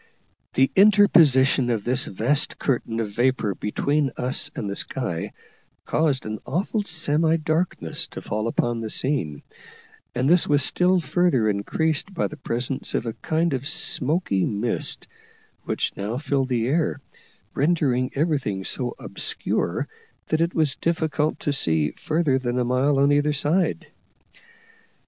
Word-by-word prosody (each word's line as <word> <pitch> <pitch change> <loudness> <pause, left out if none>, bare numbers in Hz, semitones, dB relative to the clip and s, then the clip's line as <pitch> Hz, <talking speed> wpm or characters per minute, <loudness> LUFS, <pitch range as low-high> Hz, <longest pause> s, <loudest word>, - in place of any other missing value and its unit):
The 135 0 +3
interposition 160 -11 +5
of 110 -4 -1
this 125 +2 +2
vast 130 +9 0
curtain 115 -4 -1
of 110 -2 -3
vapour 120 -2 +1
between 140 +8 -1
us 125 +1 -1
and 105 - -4
the 100 - -3
sky 90 -11 -2 0.5
caused 150 -4 0
an 110 0 -4
awful 185 - -1
semi 160 -3 +1
darkness 155 - -1
to - - -9
fall 110 +2 -2
upon 120 0 -1
the 110 - -4
scene, 105 - -1 0.7
and 130 - +1
this 175 +3 +4
was 145 -1 +3
still 180 +4 +2
further 150 -6 +1
increased 155 - -1
by - - 0
the 150 - -5
presence 125 -2 -3
of - - -1
a 115 - -3
kind 160 +8 -1
of 135 +1 -2
smoky 145 - +2
mist, 110 +3 -1 0.6
which - - -2
now 105 +4 -3
filled 135 -2 -1
the 120 -3 0
air, 150 +2 0 0.5
rendering 135 -5 +1
everything 140 - -1
so 125 -2 -1
obscure - - -1 0.4
that 160 +1 +1
it 170 +1 0
was 155 -4 +1
difficult 160 -2 -1
to 145 - 0
see 80 - +1
further 155 -4 0
than 125 -1 -2
a 125 - +1
mile 130 +3 +2
on 140 +1 +4
either 145 +1 +2
side. 155 +6 0
135 Hz, 145 wpm, -23 LUFS, 120-155 Hz, 0.7 s, interposition